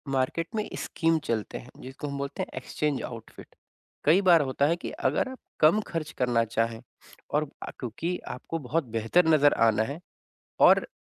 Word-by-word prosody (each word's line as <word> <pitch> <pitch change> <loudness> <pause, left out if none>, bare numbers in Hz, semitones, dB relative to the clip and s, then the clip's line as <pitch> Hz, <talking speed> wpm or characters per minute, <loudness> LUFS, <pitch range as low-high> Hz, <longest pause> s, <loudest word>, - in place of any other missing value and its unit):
market 135 +6 0
में 215 -1 -1
scheme 165 -1 +1
चलते 110 -3 -2
हैं 120 - -11
जिसको 135 +3 -7
हम 140 -1 -4
बोलते 140 0 -4
हैं - - -6
एक्सचेंज 140 +2 -2
आउटफिट 115 -2 -10 0.5
कई 165 +6 +6
बार 170 -2 +7
होता 140 +2 +1
है 165 - +2
कि 175 - -6 0.2
अगर 150 - 0
आप 260 - -8 0.2
कम 160 +7 +5
खर्च 160 -2 -4
करना 120 -2 +3
चाहे 115 0 -1 0.5
और 150 0 0
अ, - - -6
क्योंकि 160 +9 -3 0.2
आपको 165 +6 -5
बहुत 165 +5 +1
बेहतर 135 +11 +3
नज़र 145 -1 +5 0.2
आना 110 0 +2
है 155 - -9 0.7
और - - +4
145 Hz, 175 wpm, -27 LUFS, 120-165 Hz, 0.7 s, बार